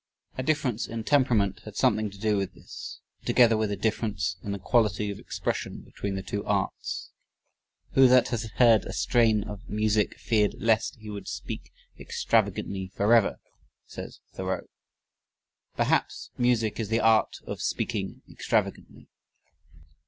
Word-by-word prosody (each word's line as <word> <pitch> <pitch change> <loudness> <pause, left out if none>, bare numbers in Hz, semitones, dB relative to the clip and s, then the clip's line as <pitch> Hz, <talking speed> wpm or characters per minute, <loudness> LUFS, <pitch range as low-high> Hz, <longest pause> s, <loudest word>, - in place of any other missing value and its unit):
A - - -2
difference 130 -5 0
in 115 -1 -5
temperament 115 -8 +2
had 105 -2 -10
something 110 -5 +2
to 100 - -13
do 105 +1 +1
with 95 -2 -2
this, - - -9 0.2
together 115 -2 +5
with 110 -1 0
a 100 - -1
difference 100 -4 -1
in 100 - -5
the 100 - -2
quality 105 0 +1
of 100 - -7
expression - - -3
between 100 -1 -5
the 95 - -4
two 100 +2 -3
arts. - - -2 0.8
"Who 135 -1 +7
that 125 -1 +5
has 115 -2 -2
heard 115 -4 +6
a - - -6
strain 110 -4 +3
of 105 -2 -9
music 105 0 +1
feared 105 -3 +1
lest 110 -1 +1
he 110 -2 -9
would 100 -1 -7
speak - - -6 0.3
extravagantly 95 -1 0
forever," 105 +3 +3 0.5
says - - -9
Thoreau. - - -3 1.1
Perhaps - - 0
music 120 -3 +1
is 110 -3 -2
the 115 +1 +2
art 110 0 +3
of - - -5
speaking - - -2
extravagantly. - - -2
110 Hz, 145 wpm, -27 LUFS, 100-115 Hz, 1.1 s, Who